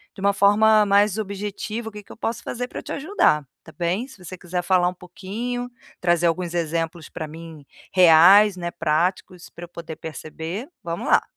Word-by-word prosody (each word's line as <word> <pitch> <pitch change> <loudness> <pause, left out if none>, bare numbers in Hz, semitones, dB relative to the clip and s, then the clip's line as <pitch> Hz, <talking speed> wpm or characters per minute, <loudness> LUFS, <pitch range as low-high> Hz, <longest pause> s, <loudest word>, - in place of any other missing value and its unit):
de 195 - -10
uma 200 0 +3
forma 210 +2 +5
mais 200 0 +3
objetiva, 210 +2 -4
o - - -17
que 210 -1 -10
que - - -16
eu - - -11
posso 230 +1 -3
fazer 245 0 -4
pra - - -7
eu - - -11
te - - -8
ajudar, 275 - +1 0.2
tá 160 - -13
bem. 180 +9 -2
Se 260 - -15
você 185 +1 -8
quiser 175 0 -3
falar 180 -1 +3
pouquinho, 220 +8 -5 0.3
trazer 175 -1 +2
alguns 175 +1 -1
exemplos 165 0 -2
pra 155 - -6
mim, 160 -2 -11 0.3
reais, 185 +3 +7
né, 175 -1 -4
práticos, 170 +2 -1
pra 175 - -10
eu - - -19
poder 170 -2 -8
perceber. 160 - -7 0.2
Vamos 170 0 -4
lá. - - +5
180 Hz, 190 wpm, -23 LUFS, 170-210 Hz, 0.3 s, reais